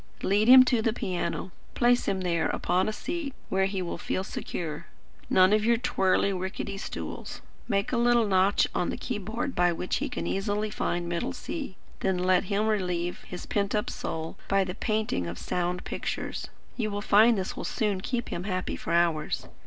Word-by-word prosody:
Lead 205 +3 +3
him 255 +1 +10
to 245 -3 +2
the 220 0 +1
piano. 185 -2 -3 0.2
Place 245 0 +3
him 195 -1 0
there 170 -3 +1
upon 180 +4 +1
a - - -1
seat 290 +4 -4
where 190 0 +2
he 195 -1 -2
will 170 - -4
feel 185 - -2
secure; 165 -4 -5 0.4
none 185 +2 +5
of 215 0 +3
your 235 +1 +4
twirly, 195 -3 +2
rickety 190 +1 -4
stools. - - -6 0.3
Make 200 -3 0
a 250 - +1
little 240 -1 +4
notch 195 0 +3
on 175 - 0
the - - -3
key 240 -4 -3
board 230 +7 -3
by 175 0 +3
which 175 +2 -2
he - - -2
can - - -4
easily 205 +2 -1
find 175 -4 -1
middle 170 0 -2
C. 280 - -5 0.2
Then 190 -1 +1
let 180 +1 +3
him 205 +2 0
relieve 180 -5 -1
his 180 - -7
pent 200 0 0
up 210 - 0
soul 160 0 -5
by 195 0 +3
the 185 -1 -4
painting 215 - -1
of 85 +1 -5
sound 180 0 -2
pictures. - - -4 0.3
You 220 -3 -1
will 205 0 -3
find 220 +3 +6
this 190 -1 -3
will - - -5
soon 205 -4 -1
keep 240 +3 -2
him 175 - -4
happy 185 -2 -2
for 165 - -4
hours. 170 -3 +1
195 Hz, 190 wpm, -28 LUFS, 180-215 Hz, 0.4 s, him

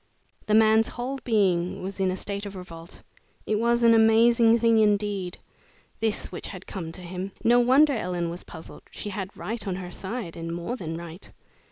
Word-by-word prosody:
The 215 - +3
man's 220 0 +5
whole 260 +3 -4
being 185 -7 +1
was 195 +1 -6
in 190 -1 +2
a 185 - -2
state 200 +1 -4
of 200 - -9
revolt. 170 -2 -10 0.4
It 215 -1 0
was 235 +1 +2
an 230 0 +7
amazing 230 +1 +5
thing 230 -1 +3
indeed, 205 -3 +1 0.6
this 220 -2 -1
which 180 - -6
had 185 -1 -9
come 170 -4 -6
to 185 - -8
him. 185 +2 -6
No 240 +1 +5
wonder 270 +5 +5
Ellen 180 -6 -2
was 175 - -7
puzzled! 160 -1 -11
She 205 - -6
had 190 0 -6
right 220 -1 -5
on 185 - -1
her 180 -1 -7
side, 195 -1 -5
and 165 0 -5
more 175 +8 -4
than 165 -9 -5
right. 170 +2 -10
200 Hz, 190 wpm, -26 LUFS, 180-225 Hz, 0.6 s, an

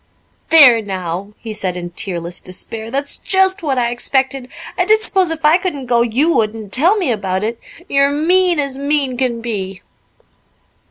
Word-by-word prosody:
"There 265 -8 +8
now!" 190 0 -5
he 225 -2 -8
said 185 -4 -3
in 175 -1 -6
tearless 175 -1 -4
despair. 220 +4 -6
"That's 280 +3 -1
just 380 0 +1
what 280 -5 -2
I 240 -1 0
expected. 265 +1 -1 0.3
I - - +1
did 435 +1 +3
s'pose 380 -5 +2
if 325 -1 -3
I 315 +4 +5
couldn't 295 -8 -4
go 240 -1 +2
you 255 +8 +1
would, 215 0 0
and 215 -3 -10
tell 345 +11 +3
me 360 -11 0
about 190 -3 -2
it. 230 +2 -3 0.3
You're 275 -2 +3
mean 350 +4 +2
as 275 -2 -2
mean 280 -2 0
can 245 -2 -2
be." 195 -5 -5
250 Hz, 175 wpm, -16 LUFS, 210-300 Hz, 0.3 s, There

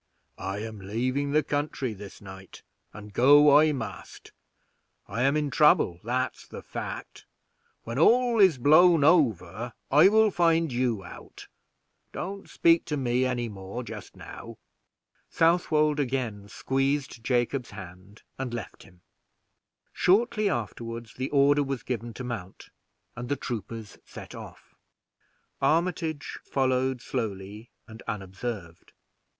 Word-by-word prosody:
"I 95 +2 -4
am 110 -2 -7
leaving 125 +8 -2
the 150 +2 +2
country 145 -4 -2
this 100 -1 -11
night, 95 -1 -12 0.3
and 105 0 -11
I 145 +3 +6
must 115 -8 -7
go. - - -17 0.8
I 115 - 0
am 140 +3 +3
in 150 -2 -1
trouble, 140 - +4
that's 125 +2 -2
the - - -9
fact; - - -7 0.6
when 115 +3 -4
all 240 +5 +4
is 185 -8 +6
blown 155 +4 +6
over, 120 - +2 0.2
I 150 +6 +7
will 215 +1 +4
find 165 -3 +2
you 120 -5 0
out. 90 - -12 0.7
Don't 195 +1 -6
speak 165 0 +3
to 150 - -2
me 125 -1 +1
any 125 -2 -1
more 100 +3 -7
just 110 -4 -9
now." - - -10 0.7
Southwold 155 -3 +2
again 120 -7 -2
squeezed 135 0 -1
Jacob's 125 +1 0
hand, 100 +1 -12 0.2
and 125 -3 -3
left 115 -5 -8
him. 90 -2 -19 0.9
Shortly 210 +3 +2
afterward 115 - -5
the 130 +1 -3
order 145 0 +4
was 135 -3 -3
given 120 -2 -4
to 130 - -6
mount, 115 -7 -7 0.5
and 120 0 -6
the 145 - +1
troopers 115 -4 -6
set - - -11
off. - - -12 0.9
Armitage 165 -2 0
followed 130 -1 0
slowly 105 -2 -5 0.2
and 110 0 -12
unobserved. 95 -3 -6
125 Hz, 125 wpm, -27 LUFS, 110-150 Hz, 0.9 s, I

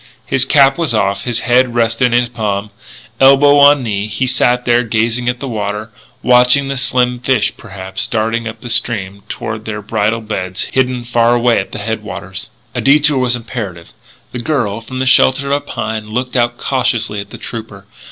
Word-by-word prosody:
His 130 0 +2
cap 135 +1 +4
was 155 -9 0
off; 100 -2 0
his 120 -1 -1
head 125 0 +2
rested 115 +1 +1
on 120 - +4
his 120 - -1
palm. 105 -3 -3 0.5
Elbow 140 +2 +6
on 145 -1 +6
knee, 105 -3 -2
he 110 +5 -2
sat 125 -1 +1
there 120 0 +3
gazing 115 +1 0
at 125 0 -3
the 135 - -5
water 105 -1 -4 0.3
watching 125 +3 +4
the 140 - -2
slim 125 -2 +1
fish, 125 -3 +1
perhaps, 95 -1 -5
darting 115 +1 -1
up 115 +1 -8
stream 100 -4 0
toward 110 0 -5
their 110 -1 -5
bridal 110 +1 -1
beds 95 -4 -4
hidden 130 -2 0
far 120 0 +2
away 120 0 +2
at - - -5
the - - -6
headwaters. 105 -2 -6 0.2
A 120 - -2
detour 145 +2 +3
was 125 -1 +2
imperative. 110 -8 -7 0.4
The 125 - -5
girl, 120 -6 -2
from 130 +3 -8
the 130 - -1
shelter 135 +1 +4
of 140 - +3
a - - -7
pine, 110 -5 -5
looked 125 +4 -3
out 120 -1 +1
cautiously 120 -5 0
at 100 - -7
the - - -9
trooper. 110 -4 -8
120 Hz, 185 wpm, -15 LUFS, 110-125 Hz, 0.5 s, Elbow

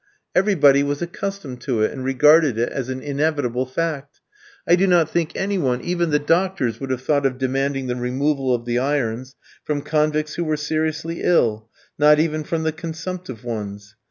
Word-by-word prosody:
Everybody 150 -9 +4
was 145 +3 -1
accustomed 175 -7 -5
to 120 -6 0
it, - - +1
and 130 - -6
regarded 145 0 +4
it 120 +1 0
as 130 -2 -4
an 130 0 -4
inevitable 140 -4 -1
fact. 145 0 -3 0.5
I - - +6
do 190 +2 +2
not 170 -4 +3
think 170 -1 -1
any 195 0 -1
one, 125 -6 0
even 175 -1 -1
the 150 - +3
doctors, 165 -5 0
would 135 - -5
have 130 0 -2
thought 145 0 +1
of 130 -2 0
demanding 135 +1 -1
the 125 -1 -2
removal 130 +2 0
of 120 -1 0
the 120 0 0
irons 130 -2 -2 0.3
from 145 -2 -2
convicts 155 0 0
who 170 - -2
were 155 -2 -1
seriously 155 +2 -2
ill, 110 -10 +2 0.3
not 150 0 +6
even 155 -1 0
from 160 +1 -2
the 160 - +1
consumptive 165 - -7
ones. 105 -3 -6
145 Hz, 185 wpm, -21 LUFS, 130-160 Hz, 0.5 s, I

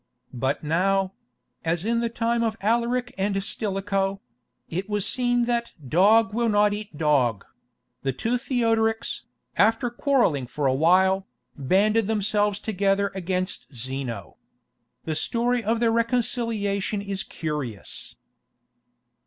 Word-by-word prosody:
But 130 +5 -1
now—as 170 -3 -2
in 230 +1 +1
the 235 0 0
time 235 0 0
of 220 -1 -1
Alaric 240 +3 0
and 195 +1 0
Stilicho—it 195 - -3
was 210 -1 0
seen 245 -2 +2
that 235 -1 -1
"dog 210 - +4
will 235 +1 +1
not 205 0 +3
eat 205 -6 -7
dog"; 130 -9 +2 0.6
the 135 - 0
two 230 - -1
Theodorics, 225 -3 0 0.3
after 230 +2 +3
quarrelling 240 - +1
for 145 +3 -3
a 130 - +3
while, 190 +6 +3 0.3
banded 200 +9 +2
themselves 210 -1 +1
together 200 -1 0
against 185 -5 -3
Zeno. 125 -7 -4 0.7
The 160 - -1
story 240 +8 0
of 225 +2 +1
their 230 -1 +3
reconciliation 225 -4 0
is 195 -1 -3
curious. 150 -10 -5
200 Hz, 115 wpm, -25 LUFS, 165-230 Hz, 0.7 s, dog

